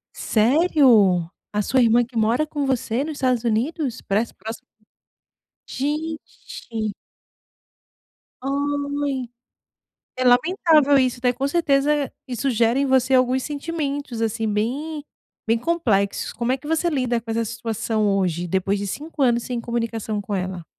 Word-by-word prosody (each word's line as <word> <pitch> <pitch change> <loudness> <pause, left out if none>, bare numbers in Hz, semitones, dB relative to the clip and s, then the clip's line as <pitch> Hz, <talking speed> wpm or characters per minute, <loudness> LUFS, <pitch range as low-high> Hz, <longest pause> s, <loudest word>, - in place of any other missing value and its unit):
Sério? 230 - +4 0.2
A 210 - 0
sua 260 +5 +2
irmã 235 +1 +4
que 240 +1 -21
mora 230 +7 +2
com 290 -2 -3
você 255 0 0
nos 315 - -4
Estados 255 -4 0
Unidos? 245 +4 -1
Parece 215 +4 0
próximo 225 +1 -7 1.1
Gente. 285 -7 -4 1.5
Ai, 285 -1 -2 0.9
é 255 - -1
lamentável 290 +2 +4
isso. 255 -1 +1
Daí 250 -1 +2
com 265 +3 -2
certeza 290 -3 +1 0.2
isso 255 +2 -1
gera 235 +1 +2
em 280 - +2
você 260 0 +3
alguns 255 0 +3
sentimentos 285 -5 -4
assim 225 0 -1
bem, 285 +9 -2 0.4
bem 225 +1 +2
complexos. 225 -10 0
Como 240 +1 -1
é 265 - +1
que 270 - -13
você 325 +2 +1
lida 255 -6 0
com 225 - -9
essa 230 +1 0
situação 225 -1 -2
hoje, 180 -2 -1
depois 190 +3 0
de 200 - -3
5 295 +8 -4
anos 240 -2 +3
sem 245 -1 -3
comunicação 230 -3 -3
com 205 0 -4
ela? 185 -2 -3
250 Hz, 140 wpm, -22 LUFS, 225-285 Hz, 1.5 s, Sério